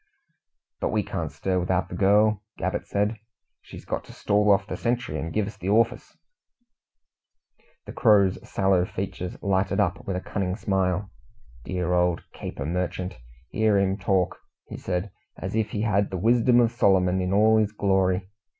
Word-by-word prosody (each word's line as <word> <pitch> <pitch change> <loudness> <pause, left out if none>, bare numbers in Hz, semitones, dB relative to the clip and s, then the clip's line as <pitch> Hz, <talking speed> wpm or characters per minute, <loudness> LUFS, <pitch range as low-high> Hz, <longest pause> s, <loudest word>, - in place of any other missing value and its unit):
"But - - -1
we - - 0
can't - - -4
stir 95 -1 -1
without 90 0 0
the - - -6
girl," 105 +2 +3 0.2
Gabbett 95 +1 -3
said. 105 +2 0 0.4
"She's - - -12
got - - -3
to - - -13
stall 105 +1 +1
off 100 0 +4
the - - -5
sentry 120 +2 -2
and 80 - -4
give 110 +2 0
us 105 - -8
the 95 - -4
orfice." 115 +5 +1 1.7
The - - -8
Crow's 100 -5 +4
sallow 95 -2 +1
features 90 -1 -5
lighted 95 -1 +1
up - - 0
with 95 - -2
a - - -1
cunning 95 -2 -2
smile. 95 0 -1 0.5
"Dear 90 -1 -1
old 90 -1 +1
caper 65 - -6
merchant! 90 -1 -3 0.3
Hear 110 -2 +2
him 95 -1 +2
talk!" 95 -2 0 0.4
said 90 -1 -2
he, 105 - -12 0.3
"as 95 - -5
if 110 -1 0
he 105 - -3
had 100 -2 +1
the 95 - -4
wisdom 120 +4 +4
of 115 -2 +3
Solomon 95 -4 +2
in 90 0 -1
all 110 +2 +5
his 105 -1 +1
glory? 95 -2 +1
95 Hz, 170 wpm, -25 LUFS, 90-105 Hz, 1.7 s, all